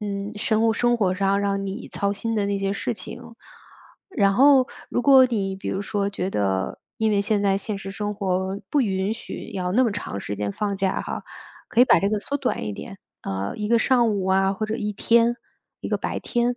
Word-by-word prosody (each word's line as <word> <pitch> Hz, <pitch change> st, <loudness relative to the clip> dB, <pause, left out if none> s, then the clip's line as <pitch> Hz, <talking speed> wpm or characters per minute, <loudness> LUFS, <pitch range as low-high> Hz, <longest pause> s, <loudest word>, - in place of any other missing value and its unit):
嗯， 200 Hz, 0 st, -4 dB
生 220 Hz, +1 st, +1 dB
物 225 Hz, -, +2 dB
生 240 Hz, 0 st, +2 dB
活 185 Hz, -3 st, +2 dB
上 195 Hz, +1 st, +1 dB
让 200 Hz, -1 st, -1 dB
你 195 Hz, +5 st, -6 dB
操 200 Hz, 0 st, -1 dB
心 225 Hz, +3 st, -3 dB
的 205 Hz, -2 st, +1 dB
那 200 Hz, 0 st, -1 dB
些 195 Hz, 0 st, -1 dB
事 240 Hz, -, -2 dB
情。 230 Hz, +4 st, -9 dB, 0.9 s
然 200 Hz, -2 st, +4 dB
后 265 Hz, +2 st, +6 dB, 0.2 s
如 245 Hz, -, -1 dB
果 265 Hz, -1 st, +7 dB
你 200 Hz, -6 st, -1 dB
比 190 Hz, -, -6 dB
如 195 Hz, -, -2 dB
说 200 Hz, 0 st, -1 dB
觉 190 Hz, -1 st, -3 dB
得 95 Hz, -, -1 dB, 0.2 s
因 220 Hz, -1 st, +1 dB
为 200 Hz, -1 st, +2 dB
现 205 Hz, 0 st, 0 dB
在 195 Hz, -1 st, +2 dB
现 210 Hz, +1 st, -4 dB
实 195 Hz, -, -7 dB
生 205 Hz, +1 st, -3 dB
活 190 Hz, -1 st, -1 dB
不 290 Hz, -, +3 dB
允 195 Hz, -3 st, 0 dB
许 230 Hz, -, -8 dB
要 180 Hz, -1 st, -2 dB
那 255 Hz, +4 st, +4 dB
么 225 Hz, -, +1 dB
长 200 Hz, -, -5 dB
时 100 Hz, +1 st, -4 dB
间 100 Hz, 0 st, -2 dB
放 200 Hz, -, -2 dB
假 190 Hz, -1 st, 0 dB
哈， -, -, -5 dB, 0.5 s
可 -, -, -3 dB
以 250 Hz, -, +9 dB
把 -, -, +5 dB
这 200 Hz, -, +1 dB
个 215 Hz, -, 0 dB
缩 280 Hz, +7 st, -2 dB
短 265 Hz, -, -2 dB
一 105 Hz, -, -3 dB
点， -, -, -9 dB, 0.2 s
呃， 95 Hz, +1 st, -3 dB
1 210 Hz, -1 st, -3 dB
个 235 Hz, +1 st, +4 dB
上 240 Hz, -1 st, +3 dB
午 200 Hz, -3 st, -1 dB
啊， 190 Hz, +1 st, +2 dB
或 215 Hz, -, -3 dB
者 215 Hz, +1 st, -2 dB
1 210 Hz, -3 st, -2 dB
天、 235 Hz, +3 st, +3 dB, 0.5 s
1 -, -, -3 dB
个 -, -, +1 dB
白 -, -, -3 dB
天。 240 Hz, +1 st, 0 dB
200 Hz, 235 characters per minute, -24 LUFS, 195-230 Hz, 0.9 s, 以